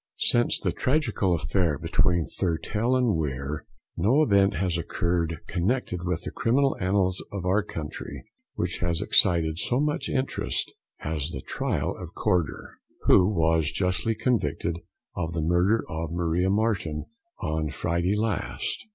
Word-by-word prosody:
Since 120 Hz, 0 st, +2 dB
the -, -, 0 dB
tragical 125 Hz, -, +1 dB
affair 80 Hz, 0 st, 0 dB
between 85 Hz, +4 st, +1 dB
Thurtell 105 Hz, +8 st, -1 dB
and 125 Hz, -4 st, +2 dB
Weare, 75 Hz, -1 st, -3 dB, 0.3 s
no 120 Hz, -, +3 dB
event 100 Hz, -6 st, +3 dB
has 90 Hz, +1 st, 0 dB
occurred 85 Hz, -1 st, -1 dB
connected 95 Hz, 0 st, -1 dB
with 90 Hz, -1 st, -2 dB
the -, -, -5 dB
criminal 135 Hz, +4 st, +2 dB
annals 95 Hz, -1 st, +1 dB
of 100 Hz, -3 st, -5 dB
our 95 Hz, +4 st, +3 dB
country 80 Hz, -7 st, -7 dB, 0.3 s
which -, -, -2 dB
has 85 Hz, -1 st, +1 dB
excited 85 Hz, -6 st, +3 dB
so 125 Hz, -, +1 dB
much 150 Hz, -1 st, 0 dB
interest 130 Hz, 0 st, -1 dB, 0.3 s
as 75 Hz, -1 st, -2 dB
the 65 Hz, -5 st, -6 dB
trial -, -, -2 dB
of 90 Hz, +1 st, -9 dB
Corder, 90 Hz, -8 st, -1 dB, 0.2 s
who 90 Hz, -, +5 dB
was 80 Hz, -5 st, +2 dB
justly 95 Hz, +6 st, +1 dB
convicted 105 Hz, -, 0 dB, 0.4 s
of 85 Hz, -2 st, -3 dB
the 80 Hz, -, -1 dB
murder 90 Hz, +7 st, +2 dB
of 80 Hz, 0 st, -4 dB
Maria 85 Hz, +1 st, +1 dB
Marten 100 Hz, -7 st, 0 dB, 0.3 s
on 75 Hz, 0 st, -2 dB
Friday 85 Hz, +6 st, 0 dB
last. 110 Hz, -, -2 dB
90 Hz, 140 wpm, -26 LUFS, 80-105 Hz, 0.4 s, who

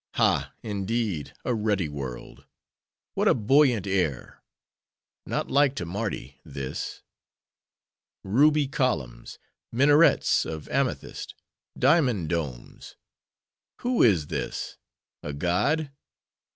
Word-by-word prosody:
—Ha! -, -, +2 dB
indeed, 100 Hz, -, -2 dB
a 125 Hz, -, +1 dB
ruddy 105 Hz, -6 st, 0 dB
world! 70 Hz, -4 st, -8 dB, 0.7 s
What -, -, +1 dB
a -, -, +5 dB
buoyant 125 Hz, -2 st, +3 dB
air! 90 Hz, -10 st, -2 dB, 0.9 s
Not -, -, -2 dB
like 140 Hz, -1 st, +3 dB
to 90 Hz, -, -3 dB
Mardi, 90 Hz, -, -5 dB
this. 70 Hz, -1 st, -6 dB, 1.2 s
Ruby 145 Hz, +8 st, +3 dB
columns: 130 Hz, -, -2 dB, 0.3 s
minarets 145 Hz, +6 st, +4 dB
of 80 Hz, -1 st, -6 dB
amethyst: -, -, -2 dB, 0.4 s
diamond 125 Hz, -, +3 dB
domes! 75 Hz, -8 st, -5 dB, 0.9 s
Who 245 Hz, -1 st, +1 dB
is 90 Hz, -10 st, +4 dB
this?—a 65 Hz, +1 st, -7 dB
god? 135 Hz, -, 0 dB
105 Hz, 90 wpm, -26 LUFS, -, 1.2 s, a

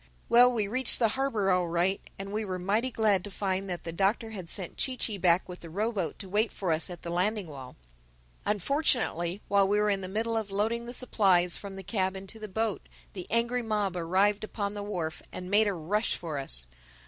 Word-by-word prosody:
Well, 245 Hz, +1 st, +8 dB
we 220 Hz, -4 st, 0 dB
reached 255 Hz, +4 st, +4 dB
the 225 Hz, -3 st, +3 dB
harbor 225 Hz, -6 st, 0 dB
all 180 Hz, -1 st, +2 dB
right 175 Hz, +3 st, +1 dB, 0.2 s
and 195 Hz, 0 st, -5 dB
we 215 Hz, +1 st, -1 dB
were 185 Hz, -3 st, -3 dB
mighty 205 Hz, +8 st, +1 dB
glad 215 Hz, -6 st, +2 dB
to 205 Hz, -, -7 dB
find 195 Hz, -1 st, -2 dB
that 175 Hz, -1 st, -4 dB
the 165 Hz, -, -4 dB
Doctor 200 Hz, +6 st, 0 dB
had 185 Hz, -6 st, -7 dB
sent 180 Hz, -1 st, -2 dB
Chee 260 Hz, -1 st, 0 dB
Chee 210 Hz, -5 st, -1 dB
back 175 Hz, 0 st, +3 dB
with 180 Hz, -1 st, -8 dB
the 170 Hz, -, -10 dB
row 210 Hz, +7 st, -1 dB
boat 185 Hz, -9 st, -3 dB
to 195 Hz, -, -8 dB
wait 210 Hz, +4 st, +1 dB
for 185 Hz, -4 st, -2 dB
us 160 Hz, +3 st, 0 dB
at 175 Hz, -2 st, -9 dB
the 170 Hz, -, -4 dB
landing 200 Hz, +4 st, 0 dB
wall. 135 Hz, -5 st, -10 dB, 0.7 s
Unfortunately 210 Hz, -, +1 dB
while 200 Hz, -1 st, +4 dB
we 205 Hz, +1 st, +2 dB
were 210 Hz, 0 st, +3 dB
in 195 Hz, -1 st, 0 dB
the 185 Hz, -, -4 dB
middle 225 Hz, +3 st, 0 dB
of 220 Hz, -2 st, -2 dB
loading 225 Hz, +4 st, 0 dB
the -, -, -5 dB
supplies 190 Hz, -8 st, +3 dB
from 200 Hz, -1 st, -7 dB
the 195 Hz, -, -7 dB
cab 190 Hz, -1 st, -1 dB
into 195 Hz, +3 st, -9 dB
the 215 Hz, -, -6 dB
boat, 220 Hz, +1 st, -1 dB, 0.3 s
the 185 Hz, -3 st, -6 dB
angry 235 Hz, +2 st, +1 dB
mob 210 Hz, -5 st, -1 dB
arrived 190 Hz, +5 st, +2 dB
upon 205 Hz, -1 st, -3 dB
the 205 Hz, -, -5 dB
wharf 175 Hz, -6 st, -4 dB
and 180 Hz, +1 st, -7 dB
made 210 Hz, +1 st, +5 dB
a 200 Hz, -, +1 dB
rush 195 Hz, +6 st, 0 dB
for 160 Hz, -5 st, -4 dB
us. -, -, -3 dB
200 Hz, 225 wpm, -29 LUFS, 180-220 Hz, 0.7 s, Well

